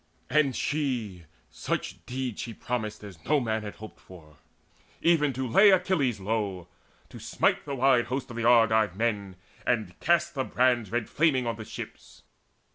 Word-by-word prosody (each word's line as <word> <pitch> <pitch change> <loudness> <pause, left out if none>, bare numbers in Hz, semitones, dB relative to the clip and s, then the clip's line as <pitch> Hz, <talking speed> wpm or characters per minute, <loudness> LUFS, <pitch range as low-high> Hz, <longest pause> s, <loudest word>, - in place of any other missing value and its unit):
And 140 -2 +3
she 120 - -2 0.3
such - - -4
deeds 125 -3 -4
she 115 -2 -6
promised 110 -3 -4
as 90 -6 -11
no 150 0 +2
man 110 -3 -1
Had 105 -1 -7
hoped 110 0 -11
for, 80 -5 -16 0.6
even 160 -4 +3
to 130 +1 -3
lay 195 - +6
Achilles 165 - +2
low, 100 -3 -2 0.4
To - - -11
smite - - 0
the 140 - -4
wide 130 -2 +3
host 130 +1 -4
of - - -8
the 115 - -3
Argive 110 -4 +4
men, 100 -3 -2 0.3
And 110 -8 -1
cast 170 +1 +2
the 135 -4 -1
brands 125 -5 +1
red 120 -1 -1
flaming 140 -5 +2
on 115 -2 -2
the 110 0 -8
ships. - - -10
120 Hz, 165 wpm, -27 LUFS, 105-135 Hz, 0.6 s, lay